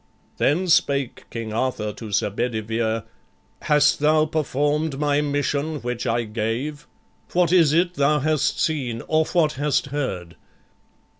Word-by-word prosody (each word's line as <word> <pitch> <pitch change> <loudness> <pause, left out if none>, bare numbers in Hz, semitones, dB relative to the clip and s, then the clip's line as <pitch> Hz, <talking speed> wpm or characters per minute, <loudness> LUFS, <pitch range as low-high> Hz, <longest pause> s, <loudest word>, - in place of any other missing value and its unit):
Then 175 +6 +1
spake 140 -6 +1
King 115 -2 -5
Arthur 110 -3 -1
to 110 0 -9
Sir 100 +1 +1
Bedivere: 110 0 -2 0.6
"Hast 150 -1 +3
thou 155 +1 +3
perform'd 150 0 -1
my 145 0 +1
mission 145 +1 -1
which 120 -1 -3
I 120 +1 +1
gave?" 115 +8 -3 0.5
What 175 -2 +3
is 170 -5 +5
it 175 +3 +2
thou 150 -2 +2
hast 155 +1 0
seen? 130 -8 -1
or 160 0 +2
what 160 -3 +2
hast 145 +1 0
heard? 90 - -4
145 Hz, 135 wpm, -23 LUFS, 115-155 Hz, 0.6 s, is